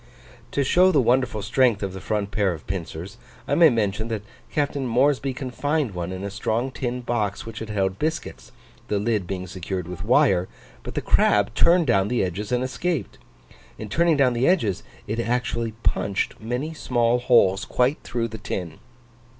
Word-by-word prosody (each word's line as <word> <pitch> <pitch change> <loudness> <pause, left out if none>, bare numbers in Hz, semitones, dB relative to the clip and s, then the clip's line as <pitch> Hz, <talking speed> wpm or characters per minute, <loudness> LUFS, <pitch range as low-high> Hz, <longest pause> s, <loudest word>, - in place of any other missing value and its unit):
To 140 - +2
show 180 +7 +5
the 150 - +3
wonderful 125 -4 +1
strength 115 -1 +2
of 95 -1 -3
the 95 - -7
front 105 -2 -2
pair 100 -4 +1
of 80 - -10
pincers, 95 +3 -6 0.3
I - - 0
may 165 -2 +7
mention, 110 -2 -1
that 110 -3 -3 0.3
Captain 140 -2 -1
Moresby 135 +3 +2
confined 135 0 -2
one 90 0 -4
in 95 +1 -5
a 100 - -4
strong 110 +5 -1
tin 125 -1 -3
box, 110 -4 -2
which 115 -2 -7
had 110 - -6
held 95 -2 -1
biscuits, 160 +1 -3 0.4
the 105 - 0
lid 105 -3 0
being 95 -1 -4
secured 90 0 -5
with 90 +1 -6
wire; 105 -6 +3 0.3
but - - -8
the - - 0
crab 105 +2 +3
turned 170 +6 +4
down 100 -7 +3
the 120 -1 +1
edges 95 +4 -4
and 125 0 +1
escaped. 135 - -3 0.6
In 110 - -7
turning 170 +4 +3
down 130 -3 +4
the 120 +2 +1
edges, 115 - +2 0.2
it 110 +3 -3
actually 115 -1 -1
punched 100 -1 0
many 125 +8 -3
small 120 -5 +1
holes 105 -6 +4
quite 125 +7 +1
through 115 -1 -2
the 110 0 -8
tin! 90 -6 -5
115 Hz, 180 wpm, -24 LUFS, 100-130 Hz, 0.6 s, may